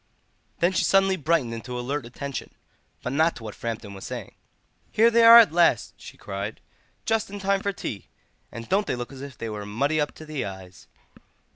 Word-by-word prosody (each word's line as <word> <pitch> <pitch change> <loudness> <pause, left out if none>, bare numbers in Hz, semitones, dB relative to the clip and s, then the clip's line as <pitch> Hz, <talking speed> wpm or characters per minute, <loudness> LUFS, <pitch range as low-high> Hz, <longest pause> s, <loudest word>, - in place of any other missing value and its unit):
Then 175 +2 +4
she 185 - +1
suddenly 195 0 +3
brightened 155 -7 0
into 125 +2 -6
alert 130 +1 -3
attention—but 130 0 -8
not 160 +3 +2
to 120 - -10
what 105 -2 -6
Framton 110 -3 -5
was 95 - -10
saying. - - -7 0.6
"Here 230 +2 +4
they 230 0 +5
are 230 +1 +11
at 230 -7 +7
last!" 170 -9 +3
she - - -12
cried. 100 +2 -5 0.5
"Just 225 -2 0
in 205 - -7
time 195 0 0
for 200 - -1
tea, 110 - -6 0.4
and 115 0 -8
don't 200 +2 +1
they - - -1
look 120 +1 -6
as 135 - -10
if 140 -4 -9
they 115 - -5
were 105 -2 -5
muddy 140 +10 0
up 150 - -1
to 155 - -11
the 155 -3 -4
eyes!" 95 -2 -9
140 Hz, 195 wpm, -25 LUFS, 115-190 Hz, 0.6 s, are